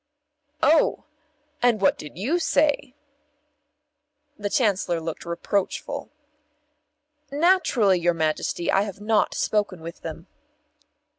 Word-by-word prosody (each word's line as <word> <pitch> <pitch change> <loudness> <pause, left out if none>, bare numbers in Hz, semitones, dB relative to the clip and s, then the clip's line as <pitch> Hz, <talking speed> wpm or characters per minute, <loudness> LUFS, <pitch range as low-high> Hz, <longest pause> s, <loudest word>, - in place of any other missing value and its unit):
"Oh! 315 +3 +4 0.6
And 240 -3 +3
what 195 - +3
did 150 +1 -10
you 275 - 0
say?" 290 -5 +1 1.4
The 205 -5 -4
Chancellor 195 -7 +1
looked 165 +1 -6
reproachful. 185 +3 -2 1.2
"Naturally, 280 - +3
your 175 0 +1
Majesty, 160 +1 -1
I 195 - +3
have 200 -2 -5
not 215 +1 +1
spoken 205 -4 0
with 165 +1 -9
them." 165 +1 -7
200 Hz, 100 wpm, -24 LUFS, 170-245 Hz, 1.4 s, Oh